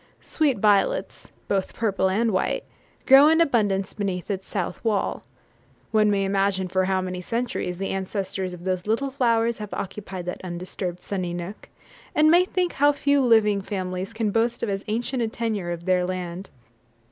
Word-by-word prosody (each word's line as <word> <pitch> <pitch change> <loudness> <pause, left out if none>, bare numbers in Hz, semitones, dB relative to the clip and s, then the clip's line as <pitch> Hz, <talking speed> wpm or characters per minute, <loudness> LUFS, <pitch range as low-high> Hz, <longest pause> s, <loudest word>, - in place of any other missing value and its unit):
Sweet 295 -6 +1
violets, 210 - +1 0.2
both 195 -2 -1
purple 200 -4 +1
and 225 +4 +1
white, 185 - 0 0.4
grow 275 +2 +8
in 320 +1 +4
abundance 205 - +1
beneath 195 -2 -3
its 190 -1 -4
south 180 0 -4
wall. 215 -4 0 0.7
One 215 -1 +4
may 200 -1 +1
imagine 195 -1 0
for 185 +1 +1
how 190 0 +1
many 185 -1 -4
centuries 230 -4 -3
the 195 +1 -3
ancestors 190 -1 -3
of 175 -1 -10
those 185 0 -2
little 265 +6 0
flowers 235 -3 +1
have 210 -1 -6
occupied 190 -2 -6
that 180 - -5
undisturbed, 180 0 -5
sunny 180 -3 -3
nook, 175 +4 -7 0.5
and 310 +1 +5
may 350 +2 +6
think 365 -1 -1
how 290 +1 +4
few 285 -1 +2
living 215 -4 +4
families 185 -1 -4
can 220 -2 -1
boast 230 +2 0
of 230 - 0
as 195 0 -2
ancient 240 +4 -1
a 230 - +1
tenure 220 -5 -3
of 170 0 -5
their 185 -1 +2
land. 180 0 -4
200 Hz, 170 wpm, -24 LUFS, 185-230 Hz, 0.7 s, grow